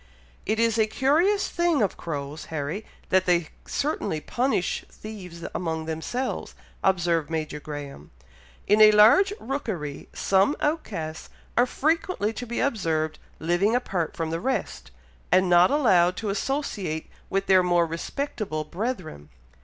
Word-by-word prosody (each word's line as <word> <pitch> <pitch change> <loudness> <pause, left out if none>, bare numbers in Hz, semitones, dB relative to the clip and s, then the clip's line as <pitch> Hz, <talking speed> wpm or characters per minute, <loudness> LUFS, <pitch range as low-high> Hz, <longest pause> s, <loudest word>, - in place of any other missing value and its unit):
"It 220 +1 +1
is 230 -1 +2
a 220 - +4
curious 330 - +2
thing 345 -7 +1
of 195 - 0
crows, 145 -1 -5
Harry, 160 +7 -4 0.2
that 185 0 +3
they 175 -2 +2 0.2
certainly 210 - -1
punish 240 - -1
thieves 180 -6 -9
among 160 -2 -2
themselves," 160 +11 -3 0.3
observed 175 -4 +2
Major 155 -2 -3
Graham. 145 - -8 0.6
"In 210 +2 +4
a 215 0 +10
large 225 - +7
rookery, 205 - -4
some 195 +9 +2
outcasts 195 - -3 0.3
are 245 - +4
frequently 310 - 0
to 245 +2 -6
be 235 - -3
observed 160 - 0 0.2
living 175 +7 +1
apart 190 -10 -2
from 160 -1 -2
the 165 - -1
rest, 260 +2 -2 0.4
and 185 +1 +5
not 175 0 +6
allowed 185 -11 +4
to 215 - -3
associate 200 - -2 0.2
with 195 0 0
their 190 -1 +6
more 175 -1 +3
respectable 165 - -3
brethren. 170 - -5
190 Hz, 135 wpm, -25 LUFS, 160-240 Hz, 0.6 s, a